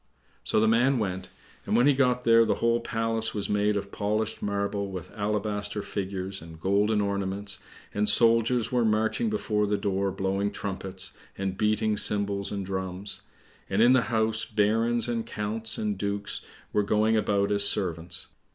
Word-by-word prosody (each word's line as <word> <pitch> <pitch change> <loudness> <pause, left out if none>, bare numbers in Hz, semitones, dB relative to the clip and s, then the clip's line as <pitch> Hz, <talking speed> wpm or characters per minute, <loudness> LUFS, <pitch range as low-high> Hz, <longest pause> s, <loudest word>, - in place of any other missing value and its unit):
So - - +2
the 110 - +3
man 120 +4 +3
went, 95 -4 -3 0.4
and - - +1
when 120 - +4
he 145 - +6
got 125 -2 +2
there 115 -1 +6
the - - +1
whole 115 0 +2
palace 115 -1 -1
was 105 -1 -2
made 105 0 +2
of 100 0 -5
polished 105 +1 -2
marble 100 0 -2
with 90 -3 -7
alabaster 105 -1 -2
figures 95 -1 -4
and 80 -1 -11
golden 105 +4 +2
ornaments, 100 0 -1 0.3
and 105 0 +1
soldiers 115 +1 +4
were 125 -1 +2
marching 110 - +1
before 110 - 0
the 105 0 +1
door 100 -1 -1
blowing 95 +1 -1
trumpets, 95 -2 -5 0.2
and 95 -1 -2
beating 105 +1 +1
cymbals 100 -1 0
and 100 -2 -3
drums; 95 +1 -5 0.5
and 95 - 0
in 120 +3 +6
the 130 - +5
house, 110 -1 +1
barons, 115 +3 +1
and 115 -1 -2
counts, 110 +1 -3
and 105 -3 -2
dukes 100 0 -3 0.3
were 105 - +3
going 110 +2 +2
about 105 -2 +1
as 100 0 +3
servants. 85 -4 0
105 Hz, 165 wpm, -27 LUFS, 100-110 Hz, 0.5 s, he